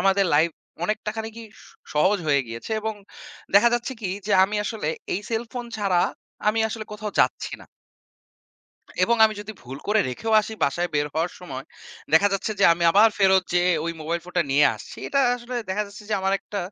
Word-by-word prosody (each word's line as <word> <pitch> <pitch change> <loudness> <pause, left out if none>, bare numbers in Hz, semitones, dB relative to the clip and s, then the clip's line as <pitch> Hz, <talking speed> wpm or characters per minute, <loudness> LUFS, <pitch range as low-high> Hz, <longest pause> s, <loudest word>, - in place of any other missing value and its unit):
আমাদের 195 0 +3
লাইফ 160 +3 +4 0.3
অনেকটা 215 +1 -2
খানিকই 225 +1 -6 0.2
স - - -16 0.3
সহজ 190 +7 +3
হয়ে 140 -2 +3
গিয়েছে 115 - -8
এবং 220 0 -3 0.6
দেখা 210 +4 +7
যাচ্ছে 240 +2 -2
কি 195 -4 -2 0.2
যে 210 - 0
আমি 210 +2 -3
আসলে 210 -9 -3 0.3
এই 195 - -1
cellphone 235 +2 -4
ছাড়া 195 -4 +2 0.5
আমি 220 +1 +2
আসলে 220 0 -5
কোথাও 210 0 -5
যাচ্ছি - - 0
না - - -12 1.4
এবং 235 0 +3
আমি 215 0 +2
যদি 215 +1 -7
ভুল 130 +2 -8
করে 215 +1 +4
রেখেও 220 - -3
আসি 220 - -7
বাসায় 175 +5 0
বের 145 0 +2
হওয়ার 165 +3 0
সময়, 135 -7 -7 0.5
দেখা 180 +6 +6
যাচ্ছে 195 +2 -1
যে - - +6
আমি 170 - -3
আবার 210 +5 +6
ফেরত 190 -1 +5
যেয়ে 180 0 +3
ওই 170 - -2
মোবাইল 170 +2 -2
ফোনটা 180 -1 0
নিয়ে 145 +2 +5
আসছি। 105 - -11
এটা 275 - +2 0.2
আসলে 245 +1 -8
দেখা 195 +3 0
যাচ্ছে 200 +1 -12
যে - - +2
আমার 190 0 0
একটা 205 - -6
200 Hz, 190 wpm, -24 LUFS, 170-220 Hz, 1.4 s, দেখা